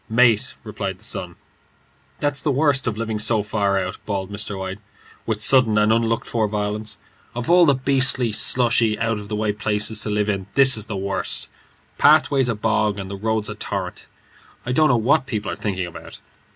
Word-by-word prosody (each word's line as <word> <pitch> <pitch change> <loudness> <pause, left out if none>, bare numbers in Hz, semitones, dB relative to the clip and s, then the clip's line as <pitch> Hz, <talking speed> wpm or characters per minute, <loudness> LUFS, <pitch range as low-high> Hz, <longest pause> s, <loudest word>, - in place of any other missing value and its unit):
"Mate," 115 -2 +2
replied - - -5
the - - -18
son. - - -3 0.8
"That's 145 -1 0
the 155 - -1
worst 140 -1 +1
of 110 -2 -2
living 110 -1 -3
so 110 0 +1
far 100 -2 -1
out," 95 -1 -4
bawled 100 -2 -4
Mr. 100 -1 -5
White, 95 +1 -6 0.5
with 110 -2 -1
sudden 120 -4 +5
and 105 +1 +3
unlooked 115 0 0
for 110 -2 -1
violence; 105 +1 -4 0.4
"of 120 +5 -2
all 175 -1 +6
the 140 - +4
beastly, 130 -2 +2
slushy, 115 -1 +3
out 115 -1 -1
of 100 -1 -11
the 105 - -3
way 105 0 -1
places 105 +1 0
to 105 - -1
live 105 0 -1
in, 100 -2 -3
this 135 -1 +6
is 105 -1 -2
the 105 - -5
worst. 95 0 -3 0.5
Pathway's 135 -3 +4
a 120 - -1
bog, 105 -1 0
and 95 -1 -7
the - - -5
road's 110 +1 -2
a 105 - -5
torrent. 100 -3 -6 0.6
I 125 - -3
don't 155 +4 +3
know 125 - +3
what 130 +5 +1
people 110 -5 -4
are - - -4
thinking 95 -3 -3
about. 85 - -11
110 Hz, 195 wpm, -21 LUFS, 105-120 Hz, 0.8 s, all